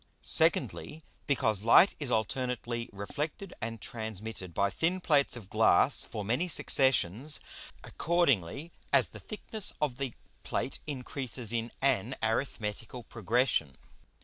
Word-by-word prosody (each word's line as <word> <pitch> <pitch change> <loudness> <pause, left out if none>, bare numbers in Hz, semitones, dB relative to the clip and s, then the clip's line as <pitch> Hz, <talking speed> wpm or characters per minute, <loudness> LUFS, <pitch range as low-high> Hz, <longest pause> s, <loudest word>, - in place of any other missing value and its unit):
Secondly, 155 +1 +1 0.2
Because 115 -8 +1
Light 145 - +7
is 145 -4 -3
alternately 120 +1 -2
reflected 150 - -5
and 115 0 -4
transmitted 110 -4 -6
by 100 +4 0
thin 175 - 0
Plates 145 -7 +2
of 110 -5 -10
Glass - - +4
for 105 - -6
many 125 - 0
Successions, 130 - +4 0.4
accordingly 150 - 0 0.2
as - - +4
the - - -11
thickness 215 -1 -6
of 145 -5 -1
the 135 -3 -4 0.3
Plate 135 - -3
increases 130 -4 -3
in 115 0 -2
an 130 -2 +1
arithmetical 110 0 -3
Progression. 115 - 0
125 Hz, 120 wpm, -30 LUFS, 110-145 Hz, 0.4 s, Light